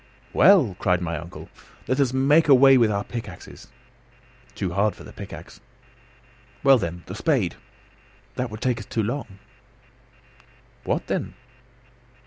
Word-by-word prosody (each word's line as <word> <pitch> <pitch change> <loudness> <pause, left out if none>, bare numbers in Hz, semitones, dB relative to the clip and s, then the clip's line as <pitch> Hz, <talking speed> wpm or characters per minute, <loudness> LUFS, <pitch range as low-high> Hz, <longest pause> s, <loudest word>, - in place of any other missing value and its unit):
"Well," 155 - +5
cried 90 -2 +1
my 85 -2 -3
uncle, 85 +1 -9 0.4
"let 130 - 0
us 135 -3 +2
make 145 +5 +3
a 140 - +8
way 135 +1 +7
with 115 -4 +4
our 100 0 -1
pickaxes." 105 -7 -9 0.9
"Too 90 -3 -3
hard 100 +2 +1
for - - -13
the - - -12
pickaxe." - - -10 1.0
"Well, 135 -3 +6
then, 85 -2 -5
the - - -8
spade." - - 0 0.8
"That 125 -1 -3
would 110 +1 -9
take 125 -2 0
us 105 - -10
too 110 - -2
long." 115 -3 -5 1.5
"What, - - -1
then?" - - -3
115 Hz, 140 wpm, -23 LUFS, 95-135 Hz, 1.5 s, a